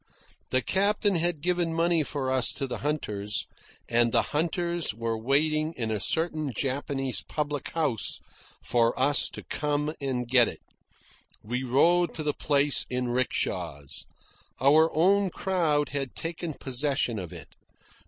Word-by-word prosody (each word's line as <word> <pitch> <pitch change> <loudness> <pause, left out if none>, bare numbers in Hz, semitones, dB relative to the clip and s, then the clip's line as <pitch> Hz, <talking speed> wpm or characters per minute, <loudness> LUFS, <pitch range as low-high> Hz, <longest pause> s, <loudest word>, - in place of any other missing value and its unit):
The 130 -1 +1
captain 200 - +2
had 170 -2 -1
given 175 -1 0
money 170 0 +2
for 140 -3 -2
us 130 -1 +1
to 140 - -3
the 125 - -5
hunters, 105 -9 -2 0.4
and 120 0 +2
the - - +3
hunters 170 - -1
were 115 0 -2
waiting 155 +7 +1
in 115 -3 -2
a 105 - -1
certain 155 - +2
Japanese 135 -1 -1
public 145 -2 -3
house 145 -10 -1 0.4
for 120 0 +1
us 140 +1 +4
to - - -8
come 150 +1 -1
and 125 -3 -2
get 120 -1 +5
it. - - -7 0.8
We 125 +4 -3
rode 165 +7 +3
to 155 - -4
the 150 -1 0
place 145 -1 +2
in 125 -1 -2
rickshaws. 85 - -2 0.5
Our 155 +5 +5
own 195 +4 +3
crowd 165 -6 0
had 135 -3 -4
taken 165 -1 -5
possession 130 -3 0
of 90 -3 -7
it. - - -10
145 Hz, 145 wpm, -27 LUFS, 125-160 Hz, 0.8 s, get